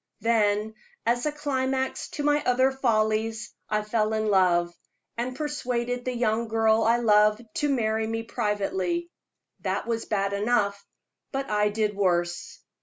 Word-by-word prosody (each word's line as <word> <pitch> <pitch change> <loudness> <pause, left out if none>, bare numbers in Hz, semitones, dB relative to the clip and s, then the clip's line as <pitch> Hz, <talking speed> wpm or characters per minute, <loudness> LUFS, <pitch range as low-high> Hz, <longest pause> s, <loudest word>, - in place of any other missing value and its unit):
Then, 215 -1 +2 0.3
as 245 +4 +1
a - - +1
climax 265 -3 -2
to 295 - -2
my 295 0 +3
other 260 +2 +3
follies, 220 -3 0 0.2
I 215 0 0
fell 215 0 0
in 215 -1 0
love, 175 -3 +3 0.4
and 245 +2 -3
persuaded 245 -5 -2
the 255 -1 -2
young 230 -1 0
girl 220 0 +3
I 230 +1 +3
loved 210 -1 +4
to 295 -3 +1
marry 220 -4 0
me 225 0 -2
privately. 225 - -2 0.5
That - - -2
was 230 -1 -2
bad 200 -2 -1
enough, 200 -1 0 0.5
but 270 -3 -3
I 210 0 +2
did 210 -1 -1
worse. 175 -3 -1
225 Hz, 145 wpm, -26 LUFS, 210-250 Hz, 0.5 s, loved